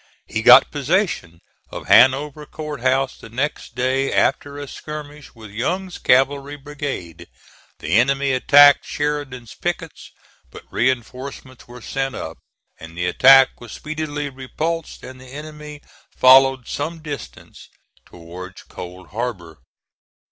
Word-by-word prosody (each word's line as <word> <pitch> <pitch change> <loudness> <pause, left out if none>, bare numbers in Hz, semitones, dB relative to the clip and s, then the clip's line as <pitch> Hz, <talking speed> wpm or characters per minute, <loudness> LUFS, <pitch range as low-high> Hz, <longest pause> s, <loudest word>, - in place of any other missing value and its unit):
He 110 - -3
got 125 +3 +7
possession 145 - -1 0.3
of - - -8
Hanover 135 +7 +4
Court 150 -4 -7
House 130 +1 0
the - - -12
next 125 0 -4
day 130 +2 0
after 145 0 0
a 145 0 -7
skirmish 150 -1 -9
with 110 -3 -12
Young's 180 - -3
cavalry 140 +2 +2
brigade. 140 - -7 0.5
The - - -8
enemy 135 +2 +1
attacked 145 +2 +6
Sheridan's 145 -5 -4
pickets, - - -5 0.4
but - - -12
reinforcements 130 +1 -3
were 120 -1 -12
sent 135 -1 -3
up 80 - -7 0.4
and 80 +1 -12
the 90 - -1
attack 135 +9 +5
was 120 -2 -10
speedily 155 -1 -5
repulsed 155 +5 -5
and 130 0 -11
the 130 - -14
enemy 150 0 -10 0.3
followed 130 -1 +5
some 155 +2 -5
distance 145 - -9 0.3
towards 90 +2 -11
Cold 90 0 -11
Harbor. 95 - -5
135 Hz, 125 wpm, -20 LUFS, 120-145 Hz, 0.5 s, got